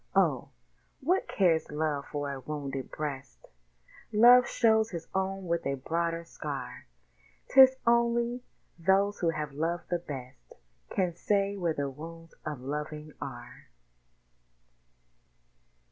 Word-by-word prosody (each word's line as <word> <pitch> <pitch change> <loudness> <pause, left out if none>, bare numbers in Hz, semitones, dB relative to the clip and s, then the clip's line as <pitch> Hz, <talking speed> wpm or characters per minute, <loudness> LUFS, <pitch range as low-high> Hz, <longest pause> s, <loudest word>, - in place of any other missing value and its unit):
Oh! - - +2 0.5
what 355 +8 +1
cares 170 -5 +2
Love 150 -2 -2
for 145 -1 -3
a 135 - -6
wounded 135 -1 -5
breast? 135 - -6 0.7
Love 240 +3 +7
shows 220 -2 +3
his 170 -5 -6
own 190 0 -1
with 170 -1 -1
a 140 - 0
broader 165 +4 -2
scar: 165 - -6 0.6
'Tis 265 -1 +8
only 235 +1 +2 0.4
those 195 +4 +2
who 170 - +2
have 150 -2 -3
loved 165 +4 -2
the 175 - +1
best 130 - -9 0.3
Can 180 -3 0
say 200 +2 +1
where 170 -5 -1
the 140 -1 -1
wounds 165 +4 -10
of 150 -4 -5
loving 150 +2 -5
are. 120 - -9
165 Hz, 120 wpm, -29 LUFS, 145-200 Hz, 0.7 s, Tis